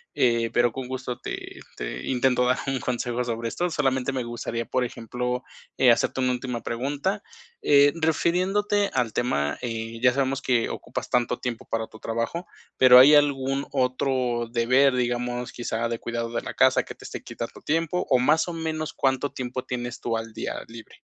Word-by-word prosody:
eh, 115 Hz, -2 st, +2 dB
pero 120 Hz, 0 st, +3 dB
con 130 Hz, +1 st, -6 dB
gusto 130 Hz, -1 st, -5 dB
te -, -, -7 dB, 0.2 s
te -, -, -5 dB
intento 125 Hz, -1 st, +2 dB
dar 125 Hz, +1 st, +2 dB
un 135 Hz, -1 st, 0 dB
consejo 125 Hz, 0 st, -2 dB
sobre 115 Hz, -1 st, -3 dB
esto. 175 Hz, +8 st, -1 dB
Solamente 135 Hz, -4 st, 0 dB
me 130 Hz, -2 st, -1 dB
gustaría, 115 Hz, 0 st, -4 dB
por 130 Hz, +2 st, 0 dB
ejemplo, 125 Hz, +2 st, -3 dB, 0.3 s
eh, 125 Hz, -2 st, +6 dB
hacerte 125 Hz, +2 st, +1 dB
una 130 Hz, 0 st, +2 dB
última 125 Hz, -1 st, -3 dB
pregunta. 145 Hz, -, -2 dB, 0.4 s
Eh, 145 Hz, 0 st, +6 dB
refiriéndote 185 Hz, +5 st, +1 dB
al 125 Hz, -4 st, +1 dB
tema, 75 Hz, -12 st, 0 dB
eh, 115 Hz, -1 st, -4 dB
ya 125 Hz, -1 st, +5 dB
sabemos 135 Hz, 0 st, 0 dB
que 125 Hz, -4 st, +1 dB
ocupas -, -, -5 dB
tanto 125 Hz, 0 st, +1 dB
tiempo 120 Hz, -2 st, -4 dB
para 110 Hz, 0 st, -2 dB
tu 110 Hz, -, -14 dB
trabajo, 115 Hz, +12 st, -3 dB, 0.3 s
pero, 125 Hz, -1 st, +8 dB
¿hay 140 Hz, +4 st, +9 dB
algún 140 Hz, -1 st, +2 dB
otro 125 Hz, -2 st, 0 dB
deber, 130 Hz, +3 st, +4 dB
digamos, 120 Hz, 0 st, -1 dB
quizá 115 Hz, -1 st, -2 dB
de 115 Hz, -1 st, -3 dB
cuidado 115 Hz, 0 st, -3 dB
de 115 Hz, -, -2 dB
la -, -, -5 dB
casa, -, -, +4 dB
que -, -, -9 dB
te -, -, -16 dB
esté -, -, -6 dB
quitando -, -, -7 dB
tiempo, 165 Hz, +3 st, 0 dB
o 125 Hz, -, +5 dB
más 150 Hz, +7 st, +3 dB
o 175 Hz, -, -4 dB
menos 160 Hz, -1 st, -3 dB
cuánto 135 Hz, +1 st, 0 dB
tiempo 130 Hz, 0 st, -4 dB
tienes 120 Hz, -1 st, -4 dB
tú 115 Hz, -1 st, -1 dB
al 115 Hz, 0 st, -6 dB
día, -, -, -4 dB
libre? 115 Hz, 0 st, -12 dB
125 Hz, 180 wpm, -25 LUFS, 120-135 Hz, 0.4 s, hay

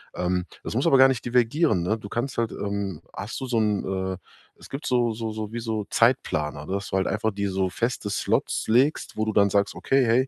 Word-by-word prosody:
ähm, 90 Hz, 0 st, 0 dB, 0.2 s
das -, -, -4 dB
muss 130 Hz, -, +1 dB
aber 135 Hz, -, +6 dB
gar 130 Hz, 0 st, +8 dB
nicht 130 Hz, -3 st, -1 dB
divergieren, 120 Hz, -, +2 dB
ne? 105 Hz, +6 st, 0 dB
Du 105 Hz, -2 st, -9 dB
kannst 120 Hz, +5 st, -3 dB
halt 115 Hz, -1 st, 0 dB
ähm, 100 Hz, -4 st, -3 dB
hast 105 Hz, +3 st, -5 dB
du 135 Hz, -, -4 dB
so 125 Hz, -2 st, -1 dB
'n 105 Hz, -2 st, +1 dB, 0.3 s
äh, -, -, -7 dB, 0.4 s
es -, -, -12 dB
gibt 135 Hz, +2 st, -6 dB
so 120 Hz, -2 st, +2 dB
so 110 Hz, 0 st, -4 dB
so 110 Hz, 0 st, -5 dB
wie 120 Hz, -, -2 dB
so 110 Hz, -2 st, -2 dB
Zeitplaner, 75 Hz, -1 st, +1 dB
dass 100 Hz, +4 st, -3 dB
du 95 Hz, -, 0 dB
halt 95 Hz, -, +1 dB
einfach 105 Hz, +3 st, 0 dB
dir 100 Hz, -1 st, -2 dB
so 95 Hz, 0 st, 0 dB
feste 115 Hz, +1 st, -2 dB
Slots 100 Hz, -, 0 dB
legst, 130 Hz, +7 st, +2 dB
wo 110 Hz, -, 0 dB
du 110 Hz, -, 0 dB
dann 100 Hz, -1 st, +4 dB
sagst: 100 Hz, +1 st, +1 dB
„Okay, 135 Hz, 0 st, +2 dB
hey, 120 Hz, +3 st, +3 dB
110 Hz, 235 wpm, -25 LUFS, 100-120 Hz, 0.4 s, gar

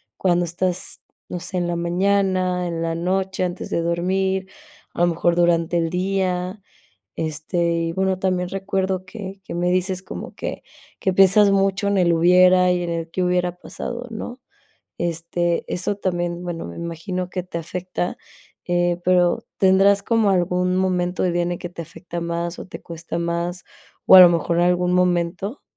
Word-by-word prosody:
¿Cuándo 175 Hz, -2 st, +1 dB
estás, 175 Hz, +2 st, -3 dB, 0.3 s
no 180 Hz, -, -5 dB
sé, 185 Hz, -, -5 dB
en 175 Hz, -1 st, 0 dB
la 175 Hz, -, -1 dB
mañana, 185 Hz, 0 st, +1 dB
en 165 Hz, -1 st, -3 dB
la 165 Hz, 0 st, -1 dB
noche, 185 Hz, +2 st, -1 dB
antes 180 Hz, 0 st, -4 dB
de 170 Hz, -, +1 dB
dormir, 190 Hz, +3 st, 0 dB, 0.5 s
a -, -, -3 dB
lo 175 Hz, -, +5 dB
mejor 170 Hz, 0 st, +1 dB
durante 170 Hz, 0 st, +2 dB
el 165 Hz, -, 0 dB
día?, 185 Hz, +1 st, -1 dB, 0.6 s
este, 160 Hz, +2 st, -1 dB
y, 165 Hz, 0 st, -1 dB
bueno, 190 Hz, +1 st, 0 dB
también 185 Hz, -1 st, 0 dB
recuerdo 190 Hz, -1 st, -2 dB
que 195 Hz, 0 st, -8 dB
que -, -, -8 dB
me 175 Hz, +1 st, 0 dB
dices 185 Hz, 0 st, 0 dB
como -, -, -8 dB
que -, -, -5 dB, 0.4 s
que 190 Hz, -, +1 dB
piensas 195 Hz, +2 st, +6 dB
mucho 195 Hz, +1 st, +1 dB
en 200 Hz, -, +1 dB
el 170 Hz, -1 st, +3 dB
hubiera 180 Hz, +2 st, +5 dB
y 180 Hz, 0 st, 0 dB
en 175 Hz, -, -3 dB
el 165 Hz, 0 st, -4 dB
qué 185 Hz, -, -1 dB
hubiera 180 Hz, 0 st, 0 dB
pasado, 240 Hz, +6 st, -6 dB
¿no?, 245 Hz, +3 st, -6 dB, 0.6 s
este, 170 Hz, 0 st, -1 dB
eso 185 Hz, +3 st, -1 dB
también, 175 Hz, -2 st, -2 dB
bueno, 175 Hz, -2 st, -4 dB
me 85 Hz, -, -8 dB
imagino 175 Hz, +2 st, -4 dB
que 180 Hz, 0 st, -3 dB
te 180 Hz, -2 st, -5 dB
afecta, 175 Hz, +1 st, -4 dB, 0.5 s
eh, 175 Hz, 0 st, +1 dB
pero 180 Hz, -1 st, +3 dB
¿tendrás 195 Hz, +1 st, +4 dB
como 220 Hz, -1 st, +2 dB
algún 180 Hz, 0 st, +1 dB
momento 180 Hz, -1 st, 0 dB
del 180 Hz, -2 st, +1 dB
día 175 Hz, -, +1 dB
en 175 Hz, -, -1 dB
el 175 Hz, -, -4 dB
que 175 Hz, -, -5 dB
te 170 Hz, -, -7 dB
afecta 170 Hz, +1 st, -8 dB
más 170 Hz, 0 st, -3 dB
o -, -, -7 dB
te -, -, -9 dB
cuesta 170 Hz, 0 st, -6 dB
más, 170 Hz, +1 st, -2 dB, 0.4 s
o 190 Hz, -, +9 dB
a -, -, +12 dB
lo 180 Hz, -, +10 dB
mejor 170 Hz, 0 st, 0 dB
algún 180 Hz, 0 st, +2 dB
momento? 180 Hz, -, 0 dB
180 Hz, 175 wpm, -22 LUFS, 170-190 Hz, 0.6 s, a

